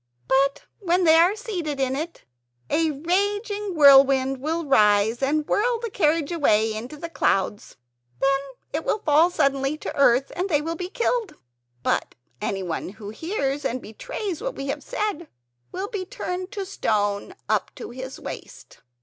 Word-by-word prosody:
But 275 +1 +2 0.2
when 365 -2 +1
they 320 -2 +6
are 345 +5 +5
seated 360 - -4
in 265 -1 +1
it 320 +4 -5 0.5
a 325 0 +2
raging 405 +6 -1
wind 270 -2 +6
will 325 +3 -2
rise 210 -2 +4
and 295 +3 +1
whirl 470 +2 +1
the 460 -2 -5
carriage 315 -4 +1
away 220 -10 +2
into 240 +7 -6
the 335 - -5
clouds. 205 - -1 0.4
Then 275 0 +3 0.3
it 310 +2 -1
will - - +1
fall 310 +3 +5
suddenly 275 -3 +1
to - - -6
earth, 270 -1 +4
and 370 +3 -1
they 295 -4 +3
will 325 +3 -3
be 360 +2 -5
killed. 465 0 -1 0.5
But - - 0 0.3
anyone 185 -5 -3
who 205 +1 -9
hears 290 - -2
and 255 - -1
betrays 370 - -5
what - - -3
we 275 - -5
have - - -2
said 400 -6 -3 0.4
will 380 +2 -4
be 410 -4 -4
turned 370 -4 -5
to 400 -2 -3
stone 210 - -1
up - - +1
to - - -8
his 260 +2 -7
waist." - - -9
305 Hz, 160 wpm, -24 LUFS, 265-370 Hz, 0.5 s, they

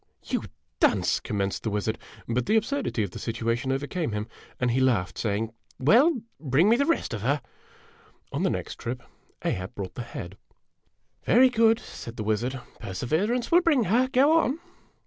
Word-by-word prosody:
O - - -43 0.2
"You - - +1 0.4
dunce!" - - +3
commenced 100 -1 -2
the 110 - -2
wizard; 105 +1 -1 0.3
but 120 +1 -1
the 220 - +3
absurdity 225 - 0
of 100 - -4
the - - -8
situation 115 +2 -1
overcame 145 - -2
him, 105 +1 -3 0.3
and 125 -1 +2
he 125 - +1
laughed, 105 -8 +2
saying: 110 +1 -1 0.2
"Well, 245 - +4 0.2
bring 155 +6 +3
me 230 - +6
the 280 +3 +1
rest 335 - 0
of 110 - -3
her! 140 +7 +1 0.5
" - - -30
On - - -1
the - - +2
next - - -4
trip, 125 +2 -4 0.4
Ahab 90 +2 -2
brought 95 -2 -5
the - - -5
head. 100 -5 -7 0.9
"Very 255 +2 +5
good," 225 -1 +4
said 115 - -9
the 110 - -3
wizard; 115 +5 -1 0.2
"perseverance 160 - -1
will 345 +1 +7
bring 300 -8 +3
her. 230 +7 +3
Go 290 +6 +5
on." 290 0 0
130 Hz, 180 wpm, -26 LUFS, -, 0.9 s, will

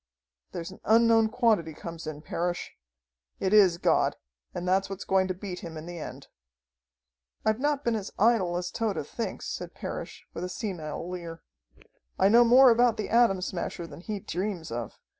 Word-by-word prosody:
"There's 170 +2 -6
an 190 - -13
unknown 225 0 +5
quantity 215 - +1
comes 165 0 -8
in, 150 -1 -6
Parrish. 175 +2 -3 0.7
It 190 +1 0
is 190 -5 +6
God, - - +2 0.4
and 180 - -5
that's 190 +1 +2
what's 195 0 -6
going 190 -1 +2
to 185 - -2
beat 185 -1 -6
him 165 -5 -8
in 155 - -7
the 175 0 -7
end." - - -8 1.2
"I've 220 +1 +2
not 290 0 0
been 235 - +1
as 205 -3 -4
idle 200 -6 +3
as 180 0 -3
Tode 215 -9 -2
thinks," 230 +9 -5
said - - -6
Parrish, - - -6
with 170 - -5
a 180 - -3
senile 175 -5 -5
leer. 170 -2 -7 0.7
"I 190 - +4
know 235 +3 +7
more 250 +2 +7
about 235 0 +4
the 215 - -3
Atom 225 -6 +4
Smasher 175 -1 -4
than 165 - -11
he 210 +2 -4
dreams 185 - -4
of. 115 -2 -5
190 Hz, 180 wpm, -28 LUFS, 170-225 Hz, 1.2 s, know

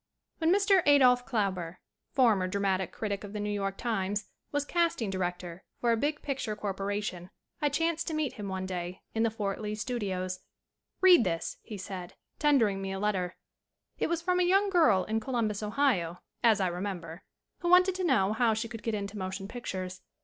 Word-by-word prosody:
WHEN 325 0 +3
MR. 395 -1 +5
ADOLPH 250 -4 +6
KLAUBER, 185 -6 -1 0.3
former 220 -8 +3
dra 200 +2 -2
matic 190 -2 0
critic 205 -2 -3
of 205 0 -8
the 210 - -3
New 210 0 -2
York 195 -1 -2
Times, 205 -3 -1 0.3
was 290 0 0
cast 340 +1 +1
ing 220 -5 -2
director 180 -1 -4 0.2
for 235 - +2
a - - +4
big 295 +6 -1
picture 265 -6 -2
corporation 200 -2 -3 0.3
I 295 - +3
chanced 330 +3 0
to 320 - -2
meet 310 -4 -1
him 205 -2 -6
one 190 -1 -3
day 180 -1 -5
in 225 - 0
the 230 - +3
Fort 210 -2 -3
Lee 210 0 -3
Studios. 195 -6 -3 0.6
"Read 365 -8 +8
this," 165 -3 -2
he 215 - -8
said, 185 -2 -7 0.2
tendering 230 -10 +3
me 195 0 -3
a 195 - -3
letter. 190 -3 -1 0.6
It - - +1
was 340 0 -1
from 360 0 +2
a - - +4
young 390 +3 +3
girl 230 - +5
in 220 +1 -1
Columbus, 220 -4 -1
Ohio, 210 -7 0 0.2
as 225 -3 +5
I 190 - +2
remember, 175 -2 -4 0.4
who 345 - -1
wanted 365 +1 +6
to 370 0 -3
know 220 - +3
how 225 -1 +2
she 225 +2 -2
could 225 -1 -8
get 225 -2 -1
into 200 0 -4
motion 190 +1 -4
pictures. 185 -5 -5
210 Hz, 195 wpm, -30 LUFS, 190-270 Hz, 0.6 s, Read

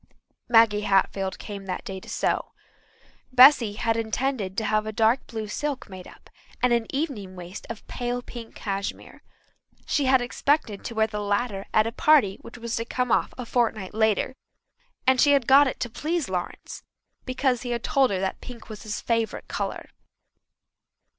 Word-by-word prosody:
Maggie 225 -3 +5
Hatfield 195 -1 +1
came 200 -2 -8
that 185 - -4
day 190 -1 -5
to - - -13
sew. - - -1 0.8
Bessy 255 -4 +7
had 225 +1 0
intended 225 -3 -2
to 220 - 0
have 215 0 +1
a - - -2
dark 225 +4 +2
blue 220 -2 -5
silk 285 +4 -4
made 185 -1 -9
up - - -16 0.3
and 250 -1 +3
an 235 -2 +1
evening 260 - -3
waist 180 +2 -9
of 230 -2 -7
pale 245 0 -3
pink 235 -2 -10
cashmere. 195 -1 -5 0.6
She 285 - +1
had 260 0 +5
expected 245 -3 0
to 230 - -5
wear 220 0 +3
the 215 -1 -5
latter 205 0 -1
at 215 - +4
a 225 - -2
party 230 -8 +4
which 235 - -11
was 235 -1 -4
to 230 - -2
come 250 0 -1
off - - +2
a 250 - -5
fortnight 225 -5 -1
later, 220 +2 +1 0.7
and 260 -1 +4
she 290 -1 +6
had 275 -4 +3
got 275 +3 +7
it - - -4
to - - 0
please 320 - -2
Lawrence, 180 -2 -5 0.4
because 255 -1 0
he 245 - -5
had 235 -1 -2
told 270 -2 +3
her 190 - -1
that 190 0 -3
pink 240 -3 -10
was 215 -1 -8
his 210 -2 -5
favourite 230 -1 -1
colour. - - -4
230 Hz, 180 wpm, -25 LUFS, 205-255 Hz, 0.8 s, Bessy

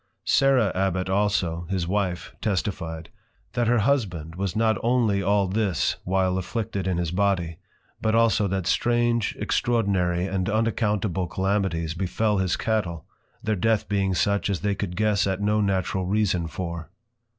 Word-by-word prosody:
Sarah 135 -6 +4
Abbot 95 -1 0
also, 95 -4 0
his 95 -3 -1
Wife, 95 -2 -2
testified, 90 -5 -3 0.4
That 120 -2 +1
her 120 +1 +4
Husband 100 - 0
was 95 0 -3
not 110 -2 +2
only 115 -5 +2
all 100 0 +2
this 95 -3 0
while 95 0 +1
Afflicted 100 0 -3
in 90 -2 0
his 85 -2 -1
Body, 90 -4 0 0.4
but 110 0 +1
also 115 -3 +3
that 95 -2 -2
strange 120 +1 +1
extraordinary 95 -7 +1
and 95 0 -1
unaccountable 105 -4 0
Calamities 95 -3 -1
befel 100 +4 0
his 95 -2 0
Cattel; 90 -8 -1 0.4
their 110 -1 0
Death 110 +3 +1
being 95 -2 0
such 100 +2 +1
as 95 -4 -1
they 105 0 +1
could 100 -3 -4
guess 105 0 +2
at 95 -1 -1
no 105 +1 +1
Natural 95 -2 0
Reason 95 -4 +1
for. 85 -1 -5
100 Hz, 150 wpm, -25 LUFS, 90-105 Hz, 0.4 s, Sarah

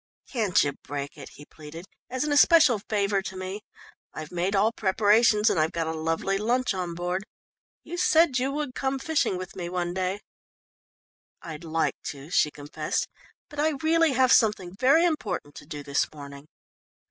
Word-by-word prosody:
"Can't 215 -8 +2
you 145 - -1
break 140 0 -6
it?" - - -10
he 145 - -13
pleaded, 160 +4 -11 0.2
"as 255 +2 -2
an 300 - -2
especial 290 - +5
favour 200 -2 +1
to 190 0 -7
me? 185 +3 -5 0.5
I've 155 -1 -7
made 180 +3 -1
all 210 +3 +3
preparations 210 +1 +3
and 205 -7 +3
I've 155 +1 +1
got 165 -1 -1
a 160 - -2
lovely 165 +5 -1
lunch 245 +2 0
on 180 -3 -4
board 180 +2 -2 0.6
you 350 - -7
said 330 -6 +4
you 265 +2 -1
would 290 -2 -3
come 270 +1 -2
fishing 285 -9 0
with 185 0 -8
me 175 -2 -5
one 175 -1 -2
day." 190 +2 -2 1.2
"I'd 160 -1 -8
like 165 0 -1
to," 145 +3 -7
she 150 - +3
confessed, 145 0 -3 0.4
"but 295 - -10
I 310 +1 +2
really 325 -2 +3
have 255 0 +3
something 210 -6 +2
very 275 - +4
important 225 - -2
to 145 - -12
do 150 -2 -7
this 140 0 -1
morning." 140 -1 -11
195 Hz, 175 wpm, -26 LUFS, 165-255 Hz, 1.2 s, especial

